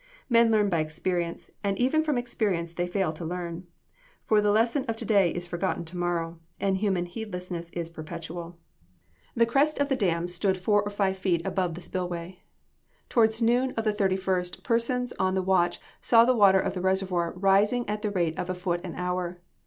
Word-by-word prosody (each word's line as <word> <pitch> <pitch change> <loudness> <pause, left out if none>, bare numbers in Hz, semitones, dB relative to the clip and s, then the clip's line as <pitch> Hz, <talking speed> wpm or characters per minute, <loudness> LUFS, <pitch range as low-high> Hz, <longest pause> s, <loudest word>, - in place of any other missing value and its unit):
Men 230 -1 +5
learn 215 -2 +3
by 170 -4 +1
experience, 170 +2 -2
and 200 -1 0
even 265 +6 +2
from 300 -4 0
experience 205 -9 -1
they 175 +1 -2
fail 180 -3 0
to 165 - -8
learn; 175 +1 -5 0.6
for 215 -1 +4
the 210 - +2
lesson 230 +6 +2
of 230 - -1
to - - -5
day 200 -5 +4
is 175 +1 -4
forgotten 175 0 -2
to 165 +3 -7
morrow: 170 -1 -2 0.2
and 195 -1 +1
human 190 -3 0
heedlessness 180 -3 -6
is 170 -1 -5
perpetual. 170 +1 -7 0.8
The 230 - +4
crest 280 +6 +2
of 285 0 0
the 270 - +2
dam 175 -7 0
stood 190 +2 0
four 205 +3 +2
or 205 - -4
five 195 -2 0
feet 175 -3 0
above 180 -4 -1
the 175 - -8
spill 180 0 -3
way. 175 +1 -6 0.7
Towards 225 0 +3
noon 245 +3 +2
of 225 - 0
the 215 -1 +1
31st, 190 -3 -1
persons 245 +1 0
on 190 0 +1
the 190 - 0
watch 180 -2 +2 0.2
saw 230 -1 +5
the 255 - +4
water 200 -4 +6
of - - -1
the 180 - -4
reservoir 185 -2 0
rising 200 +6 +3
at 210 0 -2
the 210 - -1
rate 170 -5 -1
of 180 - -3
a 185 - -1
foot 180 -1 -2
an 175 -3 -6
hour. 180 -1 -3
190 Hz, 200 wpm, -27 LUFS, 175-215 Hz, 0.8 s, water